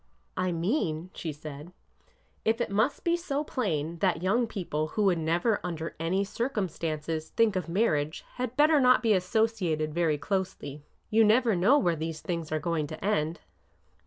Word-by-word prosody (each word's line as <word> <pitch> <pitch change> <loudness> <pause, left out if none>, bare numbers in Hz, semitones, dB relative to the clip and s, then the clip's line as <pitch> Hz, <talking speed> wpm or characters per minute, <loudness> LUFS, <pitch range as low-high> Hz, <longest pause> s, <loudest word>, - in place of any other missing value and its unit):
I 185 0 0
mean," 170 - -1
she 160 - -4
said, 150 +3 -9 0.7
if 225 +2 +1
I 240 - +1
must 220 +7 +1
be 340 0 +2
so 300 -4 -2
plain, 170 - -2
that 180 -3 +1
young 230 +6 +2
people 165 -8 -3
who 210 +7 -1
would 185 -4 +3
never 170 +7 +1
under 165 -2 -4
any 180 +4 +1
circumstances 165 - -3
think 225 -3 +2
of 180 -3 -2
marriage 160 -6 0
had 250 0 -3
better 300 +1 +5
not 255 0 +5
be 225 -2 +4
associated 185 -6 0
very 165 -3 +1
closely. 150 -3 -3 0.3
You 225 +1 +5
never 225 0 +4
know 195 +11 +5
where 175 -12 +2
these 160 0 -4
things 170 -2 -4
are 155 - +1
going 160 -2 -1
to - - -7
end." 165 -5 0
180 Hz, 165 wpm, -28 LUFS, 160-225 Hz, 0.7 s, better